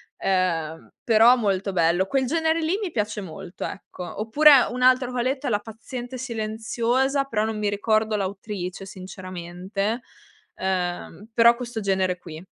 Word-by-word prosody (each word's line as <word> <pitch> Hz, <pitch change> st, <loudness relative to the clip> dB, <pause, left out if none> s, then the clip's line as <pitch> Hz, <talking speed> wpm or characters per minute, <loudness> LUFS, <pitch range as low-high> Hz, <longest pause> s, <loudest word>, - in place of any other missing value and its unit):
ehm, 170 Hz, -4 st, -1 dB
però 230 Hz, +2 st, +6 dB
molto 200 Hz, -4 st, -1 dB
bello. 170 Hz, +2 st, +2 dB
Quel 265 Hz, +6 st, 0 dB
genere 320 Hz, +3 st, +1 dB
lì 325 Hz, +5 st, 0 dB
mi 380 Hz, -, -3 dB
piace 210 Hz, -3 st, -2 dB
molto, 180 Hz, -1 st, -7 dB
ecco. 180 Hz, +1 st, -7 dB
Oppure 275 Hz, +4 st, +6 dB
un 250 Hz, +1 st, -5 dB
altro 255 Hz, 0 st, +4 dB
che 250 Hz, -, -3 dB
ho -, -, +2 dB
letto 265 Hz, +3 st, -1 dB
è -, -, +1 dB
La 210 Hz, -3 st, +1 dB
paziente 240 Hz, +4 st, -8 dB
silenziosa, 240 Hz, +3 st, -1 dB
però 220 Hz, -5 st, -1 dB
non 220 Hz, 0 st, -2 dB
mi 210 Hz, -, 0 dB
ricordo 215 Hz, +1 st, +1 dB
l'autrice 195 Hz, -1 st, -4 dB
sinceramente, 185 Hz, +3 st, -5 dB, 0.6 s
ehm, 180 Hz, +1 st, -3 dB
però 235 Hz, 0 st, +6 dB
questo 240 Hz, -2 st, -5 dB
genere 190 Hz, -2 st, 0 dB
qui. 165 Hz, -2 st, -10 dB
215 Hz, 155 wpm, -24 LUFS, 185-245 Hz, 0.6 s, però